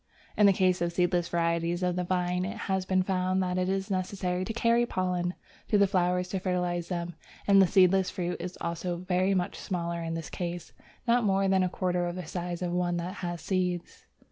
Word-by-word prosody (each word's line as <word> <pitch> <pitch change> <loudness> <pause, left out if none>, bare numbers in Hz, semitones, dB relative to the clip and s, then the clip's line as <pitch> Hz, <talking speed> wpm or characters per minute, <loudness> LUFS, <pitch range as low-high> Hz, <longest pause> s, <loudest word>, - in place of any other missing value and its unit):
In 210 - +6
the - - +7
case 185 -1 +2
of 170 0 +1
seedless 175 0 +1
varieties 170 +1 0
of 180 -1 +1
the 180 - -1
Vine, 180 0 0
it 210 +5 -4
has 190 -3 -1
been 185 -1 +2
found 185 0 0
that 180 0 -1
it 185 0 0
is 195 +1 -1
necessary 185 -1 -1
to 225 - -3
carry 235 +1 +3
pollen 180 -4 -1 0.3
to 210 - +3
the 200 - +6
flowers 180 -1 +1
to 195 - -2
fertilize 180 -2 -1
them, 175 -1 -3 0.3
and 195 -1 +6
the 190 - +5
seedless 190 +1 +4
fruit 180 -1 -3
is 180 +1 -6
also 170 +1 -2
very 185 +2 +1
much 180 -1 -1
smaller 170 -2 -3
in 165 0 -3
this 165 -1 -6
case, 175 -1 -5 0.3
not 240 +1 +4
more 195 -1 +2
than 190 0 +3
a 185 - +1
quarter 180 -1 -1
of 175 - -4
the 180 -2 -5
size 175 +1 -4
of 175 - -1
one 175 0 0
that 175 +2 -3
has 175 -2 -4
seeds. 180 -2 -2
180 Hz, 215 wpm, -29 LUFS, 175-190 Hz, 0.3 s, the